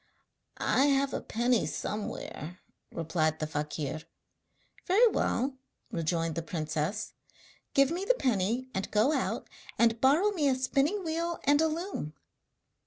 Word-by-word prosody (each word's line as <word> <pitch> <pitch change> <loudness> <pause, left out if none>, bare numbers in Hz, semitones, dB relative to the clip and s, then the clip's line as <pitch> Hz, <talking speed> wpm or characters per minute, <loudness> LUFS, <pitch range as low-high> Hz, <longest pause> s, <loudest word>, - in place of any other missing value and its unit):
'I 270 - +3
have 275 -1 +2
a - - -2
penny 240 +1 +1
somewhere,' 180 -5 -5 0.3
replied 160 -1 0
the 155 - -2
fakir. 150 0 -3 0.9
'Very 415 +6 +6
well,' 260 - 0 0.3
rejoined 165 0 -1
the 165 - -2
princess, 160 +5 -3 0.6
'give 275 +1 +5
me 355 +3 -2
the - - +3
penny 240 - 0
and 190 +1 -2
go 215 +8 +3
out - - -1 0.3
and 230 -1 +3
borrow 310 +11 +4
me 320 -8 +1
a 265 - +3
spinning 280 +9 +1
wheel 335 +1 -2
and 290 +2 +4
a 320 - +4
loom.' 315 - -4
245 Hz, 135 wpm, -30 LUFS, -, 0.9 s, Very